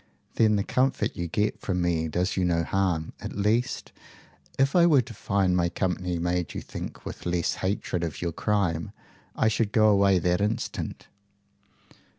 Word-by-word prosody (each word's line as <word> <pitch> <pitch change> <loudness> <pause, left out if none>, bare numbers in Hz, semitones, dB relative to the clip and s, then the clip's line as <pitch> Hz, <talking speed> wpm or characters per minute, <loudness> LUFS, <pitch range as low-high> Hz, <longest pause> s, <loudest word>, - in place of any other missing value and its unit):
"Then 110 -2 +3
the 100 - +1
comfort 130 +5 0
you 85 - -3
get 105 +6 -1
from 90 -2 -1
me 85 -2 +1
does 90 +4 -1
you 95 - +1
no 85 -2 +2
harm, 85 -3 -1
at - - -7
least. 110 +5 0 0.7
If 135 +3 +2
I 170 -1 +6
were 145 -6 +5
to 115 - -10
find 100 -3 +1
my 85 -1 +2
company 90 -1 -2
made 85 0 -1
you - - -3
think - - -8
with - - -6
less 85 -1 0
hatred 95 -2 -1
of 80 -3 -4
your 85 -1 -2
crime, 85 -4 -1 0.4
I - - +2
should 110 -1 +1
go 110 -1 +5
away 100 -2 +4
that 90 +1 +1
instant." 105 +2 -3
95 Hz, 170 wpm, -26 LUFS, 85-105 Hz, 0.7 s, I